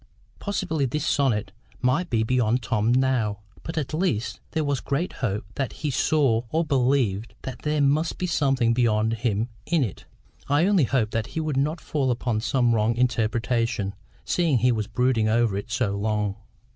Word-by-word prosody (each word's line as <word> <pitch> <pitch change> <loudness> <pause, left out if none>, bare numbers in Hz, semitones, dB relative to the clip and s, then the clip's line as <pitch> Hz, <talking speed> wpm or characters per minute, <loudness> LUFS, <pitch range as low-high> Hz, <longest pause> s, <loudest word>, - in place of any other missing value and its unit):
Possibly 160 -8 -1
this 150 +4 -2
sonnet 115 -9 +1 0.3
might 140 +8 +1
be 110 -2 +1
beyond 120 0 +1
Tom 110 +1 +1
now, 125 -5 +1 0.2
but, 165 - -6
at 150 -1 -2
least, 155 - -1
there 160 - -1
was 145 -2 0
great 145 +8 -2
hope 105 -5 -1
that 135 -3 -2
he 150 -2 -3
saw, 135 -4 +2
or 165 +5 +1
believed, 125 -6 +1
that 130 -2 -6
there 150 0 0
must 150 +4 +2
be 180 - -2
something 135 -8 +2
beyond 110 -2 +2
him 115 0 -1 0.2
in 170 -5 +2
it. 105 - -5 0.4
I 145 +4 +4
only 195 -7 +4
hoped 115 -4 0
that 115 -1 -1
he - - +2
would 155 -3 -1
not 150 +5 0
fall 140 -5 -1
upon 120 -2 0
some 120 -1 +2
wrong 110 +1 +2
interpretation, 115 -3 0 0.3
seeing 165 -7 +2
he 125 +2 +3
was 110 -3 -1
brooding 115 -1 +1
over 115 -2 +2
it 100 +4 -4
so 115 -4 0
long. 105 -1 -1
125 Hz, 175 wpm, -25 LUFS, 110-145 Hz, 0.4 s, I